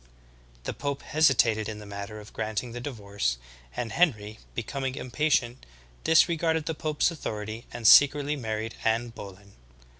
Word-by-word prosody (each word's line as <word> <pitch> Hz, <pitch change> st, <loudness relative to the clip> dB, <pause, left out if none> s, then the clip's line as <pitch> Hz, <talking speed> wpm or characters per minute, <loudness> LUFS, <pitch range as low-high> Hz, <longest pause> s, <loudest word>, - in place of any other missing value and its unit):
The -, -, -3 dB
pope 140 Hz, -1 st, -4 dB
hesitated 120 Hz, -8 st, +3 dB
in 110 Hz, -, -5 dB
the 105 Hz, -, -10 dB
matter 100 Hz, +1 st, -7 dB
of 105 Hz, 0 st, -13 dB
granting 110 Hz, +2 st, -3 dB
the 120 Hz, -, -6 dB
divorce, 100 Hz, -, -2 dB, 0.4 s
and 115 Hz, -2 st, -3 dB
Henry, 110 Hz, -9 st, +1 dB, 0.2 s
becoming 130 Hz, +3 st, -3 dB
impatient, 130 Hz, -2 st, 0 dB, 0.4 s
disregarded 160 Hz, -1 st, +3 dB
the 160 Hz, -, -1 dB
pope's 155 Hz, +2 st, 0 dB
authority 110 Hz, -7 st, -6 dB
and 120 Hz, -1 st, -7 dB
secretly 145 Hz, +5 st, +7 dB
married 110 Hz, -3 st, -3 dB
Anne 115 Hz, +2 st, +1 dB
Boleyn. 100 Hz, -3 st, -11 dB
120 Hz, 140 wpm, -27 LUFS, 110-145 Hz, 0.4 s, secretly